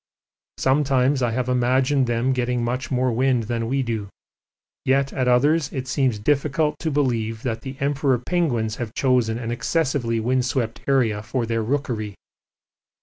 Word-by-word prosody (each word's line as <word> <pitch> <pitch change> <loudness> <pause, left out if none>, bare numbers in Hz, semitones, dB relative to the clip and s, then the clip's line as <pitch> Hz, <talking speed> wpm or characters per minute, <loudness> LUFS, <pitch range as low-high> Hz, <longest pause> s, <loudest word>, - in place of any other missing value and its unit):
Sometimes 135 0 +2
I 120 - +2
have 125 +2 -2
imagined 130 +2 +2
them 120 +3 +1
getting 125 -1 -1
much 125 +3 -2
more 130 -1 +1
wind 125 0 +2
than 115 0 -2
we 135 +2 0
do, 110 -4 -3 0.7
yet 135 +1 +1
at 130 -2 0
others 145 +5 +3
it 130 -2 -4
seems 130 -3 +1
difficult 145 +5 0
to 160 - -1
believe 115 -6 -1
that 115 -3 -2
the 130 +1 -7
Emperor 140 -2 +1
penguins 120 -6 -1
have 115 -3 -5
chosen 125 -4 +2
an 115 -1 -4
excessively 120 -1 0
wind 125 +3 +1
swept 120 -2 -2
area 120 -7 +2
for 120 +2 -2
their 115 0 -1
rookery. 110 -4 -2
125 Hz, 155 wpm, -23 LUFS, 115-135 Hz, 0.7 s, others